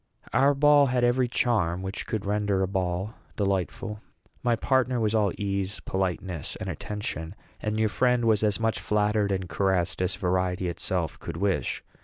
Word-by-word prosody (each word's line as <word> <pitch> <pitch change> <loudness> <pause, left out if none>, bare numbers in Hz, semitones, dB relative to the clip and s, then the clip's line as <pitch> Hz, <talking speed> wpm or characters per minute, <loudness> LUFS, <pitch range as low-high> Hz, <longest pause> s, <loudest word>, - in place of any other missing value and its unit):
Our 140 +4 +4
ball 145 0 +6
had 125 -1 +1
every 125 +1 +3
charm 100 -8 +1
which 95 +2 -5
could 110 -3 -2
render 100 -1 +1
a - - +1
ball 95 +2 -2 0.2
delightful. 100 +2 -1 0.4
My 120 -2 +2
partner 130 +1 +1
was 110 -1 +1
all 105 -3 +3
ease, 100 0 -2
politeness, 95 -3 -3
and - - -6
attention; 100 -4 -4 0.3
and 110 0 -1
your 110 -1 +3
friend 125 +1 +2
was 110 -2 +3
as 105 -1 +2
much 115 0 0
flattered 105 0 +1
and 95 -1 -1
caressed 95 -1 0
as 90 0 0
vanity 90 0 0
itself 85 - -2
could - - -6
wish. 95 +1 0
105 Hz, 165 wpm, -27 LUFS, 95-115 Hz, 0.4 s, ball